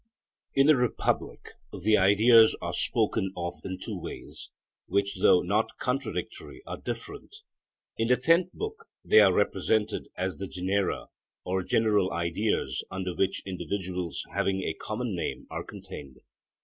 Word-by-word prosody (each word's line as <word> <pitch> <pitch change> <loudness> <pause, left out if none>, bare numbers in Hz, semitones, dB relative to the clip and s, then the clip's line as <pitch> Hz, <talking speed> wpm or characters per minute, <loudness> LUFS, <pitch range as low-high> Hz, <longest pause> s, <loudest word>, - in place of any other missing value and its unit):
In 135 - +5
the 155 0 +7
Republic 125 -2 -1 0.2
the 105 +4 +2
ideas 110 +4 +6
are - - -4
spoken 95 - 0
of 85 0 -3
in 95 -1 -4
two - - -5
ways, - - -8 0.4
which 100 +1 0
though 90 - +6
not 105 +5 0
contradictory 130 +2 -4
are - - -5
different. - - -7 0.6
In 115 - +2
the 125 +1 +4
tenth 165 +7 +3
book 440 +1 -6 0.2
they 435 - +7
are - - +6
represented 110 -1 0
as 95 0 -2
the 95 - -5
genera 95 +1 -1 0.4
or 95 +1 0
general 105 -1 +2
ideas 85 +6 -1
under 90 -1 -3
which 95 +2 0
individuals 90 -2 -3
having 95 -1 0
a 80 - -1
common 110 +3 -4
name 85 - -4
are - - -4
contained. 65 -3 -10
100 Hz, 140 wpm, -28 LUFS, 90-115 Hz, 0.6 s, the